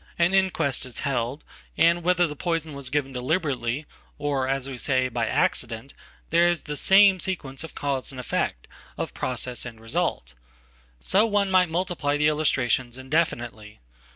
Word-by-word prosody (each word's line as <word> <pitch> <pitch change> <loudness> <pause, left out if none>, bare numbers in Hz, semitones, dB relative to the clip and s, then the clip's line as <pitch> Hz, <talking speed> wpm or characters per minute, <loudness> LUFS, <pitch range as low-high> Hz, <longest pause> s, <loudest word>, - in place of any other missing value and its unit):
Aninquest 175 -5 +2
is 125 - -7
held, 135 0 -2 0.3
and 170 +1 +4
whether 180 0 +3
the 150 -3 -5
poison 165 -1 -2
was 140 -2 -6
given 135 -1 -1
deliberately, 135 -1 -1 0.3
or, 140 -3 -1
as 135 0 -1
we 135 - -5
say, 130 0 +1
by 120 -2 -1
accident, 115 +3 -1 0.4
there 170 +1 +5
is 175 -2 -1
the 150 - -5
same 195 +3 +6
sequence 155 -7 -3
of 160 - -9
cause 140 -2 -2
andeffect, 125 - -2 0.3
of - - -4
process 125 -1 -2
and 115 -2 -9
result. 110 - -2 0.7
So 205 - +3
one 205 -2 +1
might 185 -2 +4
multiply 165 -4 -1
theillustrations 135 -5 +1
indefinitely. 120 -7 -2
140 Hz, 145 wpm, -25 LUFS, 125-170 Hz, 0.7 s, same